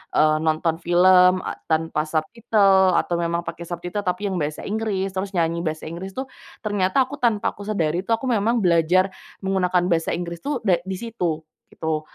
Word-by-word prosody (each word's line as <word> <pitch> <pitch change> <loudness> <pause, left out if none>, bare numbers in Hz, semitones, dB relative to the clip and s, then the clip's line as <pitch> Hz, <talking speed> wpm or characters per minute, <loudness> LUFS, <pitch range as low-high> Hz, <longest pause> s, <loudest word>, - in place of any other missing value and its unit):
eee, 155 0 +4
nonton 160 +1 0
film 180 +1 +5 0.2
tanpa 160 -1 0
subtitle 190 +2 +3
atau 175 - +1
memang 170 0 -1
pakai 170 - -7
subtitle 175 +4 -4
tapi 185 +3 -1
yang 190 - -2
bahasa 150 0 -3
Inggris 200 -3 -2
terus 190 +1 -4
nyanyi 170 -1 +1
bahasa 155 0 -3
Inggris 185 +3 -7
tuh 265 0 -4 0.4
ternyata 205 +3 +2
aku 285 +3 -8
tanpa 230 -5 +1
aku 205 0 -11
sadari 170 -6 0
tuh 230 - +2
aku 240 +3 -6
memang 225 +1 +1
belajar 180 +2 +3 0.3
menggunakan 185 -2 +1
bahasa 165 -1 +1
Inggris 170 -1 -5
tuh 285 +1 -3
de 185 -5 +3
di 190 - -2
situ 180 -8 -3 0.3
gitu 160 -1 -2
180 Hz, 175 wpm, -23 LUFS, 165-205 Hz, 0.4 s, film